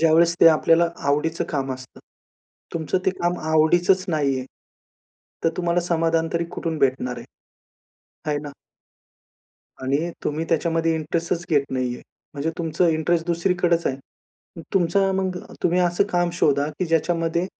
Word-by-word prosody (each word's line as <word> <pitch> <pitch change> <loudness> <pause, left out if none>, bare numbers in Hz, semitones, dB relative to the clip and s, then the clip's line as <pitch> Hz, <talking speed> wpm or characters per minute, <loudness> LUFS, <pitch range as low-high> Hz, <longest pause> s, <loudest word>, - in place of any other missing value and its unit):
ज्यावेळेस 165 +1 +4
ते - - +8
आपल्याला 165 +2 +4 0.2
आवडीचं 160 +3 0
काम 135 -2 -1
असतं. 130 0 -11 0.7
तुमचं 160 +2 0
ते 190 - +5
काम 175 +1 0
आवडीचंच 175 +4 +4
नाही 145 -5 +1
आहे, 130 - -6 1.0
तर 165 - +5
तुम्हाला 175 0 +1
समाधान 165 -1 +1
तरी 170 0 0
कुठून 165 -2 -2
भेटणार 130 -2 0
आहे? - - -9 1.1
आहे 145 - 0
ना. 145 -1 -7 1.3
आणि 140 +6 0
तुम्ही 155 +2 -1
त्याच्यामध्ये 165 0 +1
इंटरेस्टच 165 +2 -2
घेत 145 -3 +4
नाहीये. 125 -1 -2 0.3
म्हणजे 145 +3 -1
तुमचं 165 +1 +1
इंटरेस्ट 165 +1 +1
दुसरीकडेचं 175 0 +1
आहे. 130 - -7 0.6
मग 165 - -8
तुमचा 195 +2 +2
मग 190 -1 -1 0.2
तुम्ही 180 +1 +2
असं 175 +2 +2
काम 175 -1 +1
शोधा 145 -4 +2
की 185 - 0
ज्याच्यामध्ये, 165 +1 0
165 Hz, 140 wpm, -23 LUFS, 150-175 Hz, 1.3 s, ते